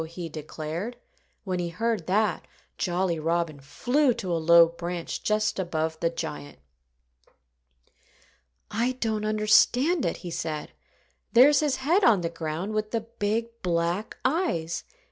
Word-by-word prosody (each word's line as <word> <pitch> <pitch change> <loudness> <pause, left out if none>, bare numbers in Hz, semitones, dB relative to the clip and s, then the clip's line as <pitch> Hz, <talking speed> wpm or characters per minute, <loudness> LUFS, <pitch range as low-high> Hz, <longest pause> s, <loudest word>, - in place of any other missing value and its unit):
he 170 +1 -6
declared. 160 +8 -6 0.5
When 185 -2 -2
he 175 -1 -2
heard 220 +1 -2
that, 200 -1 +1 0.3
Jolly 175 -2 0
Robin 165 -1 -1
flew 245 - +1
to 195 -6 -4
a 165 - 0
low 170 +1 +7
branch 170 +1 -5
just 215 -1 0
above 160 -3 -2
the 165 - +1
giant. 145 - -6 2.1
"I 240 +4 0
don't 220 -4 -2
understand 240 +9 +3
it," - - -1
he 175 - -4
said. 155 -2 -4 0.6
"There's 270 +4 +7
his 295 -4 +1
head 320 +10 +2
on 210 - +5
the 170 - -1
ground, 165 +4 -4
with 215 0 -1
the 230 0 -1
big, 225 +1 -2
black 175 +3 -1
eyes. 255 - 0
185 Hz, 135 wpm, -26 LUFS, 165-230 Hz, 2.1 s, low